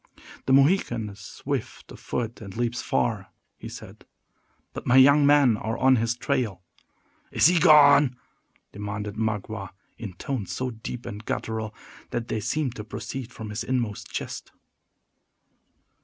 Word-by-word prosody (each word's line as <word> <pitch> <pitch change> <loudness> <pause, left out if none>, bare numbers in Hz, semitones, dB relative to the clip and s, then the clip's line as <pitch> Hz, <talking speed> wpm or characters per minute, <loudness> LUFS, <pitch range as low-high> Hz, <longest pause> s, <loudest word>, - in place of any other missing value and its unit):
"The 130 - +4
Mohican 135 - +3
is 100 0 -12
swift 95 - -5
of - - -11
foot, 115 -1 -4
and 100 -1 -9
leaps 120 0 -1
far," 105 -5 -1 0.3
he - - -8
said; - - -11 0.7
"but - - -7
my 125 - +4
young 140 +2 +7
men 145 -5 +5
are 110 +2 -3
on 130 0 +4
his 115 +1 0
trail." 105 -8 -1 0.7
"Is - - +3
he 175 +1 +6
gone?" 145 -5 +7 0.6
demanded 105 0 -5
Magua, 110 -3 -3 0.3
in 105 -5 -6
tones 115 0 -4
so 130 0 -2
deep 115 +2 -7
and 105 +2 -7
guttural, 110 -1 -3 0.3
that 120 0 -4
they 110 - -1
seemed 130 +4 -1
to 105 - -5
proceed 125 +3 -6
from 110 -3 -8
his 105 +2 -3
inmost 115 -4 -2
chest. - - -5
115 Hz, 145 wpm, -25 LUFS, 105-130 Hz, 0.7 s, young